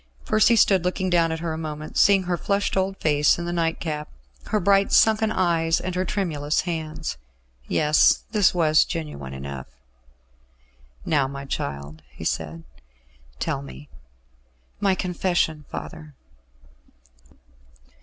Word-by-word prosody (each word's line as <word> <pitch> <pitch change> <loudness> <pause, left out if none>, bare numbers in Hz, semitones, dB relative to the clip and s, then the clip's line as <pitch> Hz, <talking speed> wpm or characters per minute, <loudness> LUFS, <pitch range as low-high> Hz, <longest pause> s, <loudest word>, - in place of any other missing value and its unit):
Percy 215 +2 +4
stood 195 -5 +4
looking 185 +1 -1
down 165 -2 +3
at 160 0 -4
her 165 -2 -2
a 160 - -5
moment, 155 -1 -6
seeing 195 -2 +5
her 180 -1 -1
flushed 200 +3 -1
old 195 0 0
face 150 -1 +3
in 170 - -4
the 175 - -3
nightcap, 165 -2 -2 0.4
her 215 - +1
bright 195 +1 +3
sunken 220 0 +4
eyes 165 -3 +1
and 185 0 -4
her 185 +1 -1
tremulous 160 -7 -1
hands. 160 - -4 0.5
Yes; 150 0 +3
this 210 -4 +4
was 155 -3 +4
genuine 70 - -6
enough. 65 -1 -7 1.4
"Now, 140 -4 +2
my 140 0 -7
child," 70 - -5
he 60 - -11
said, 80 +1 -3 0.7
"tell - - -2
me." 70 +1 -11 0.9
"My 195 -2 +2
confession, 175 -4 -1
father." 155 -3 -8
165 Hz, 130 wpm, -24 LUFS, 145-185 Hz, 1.4 s, seeing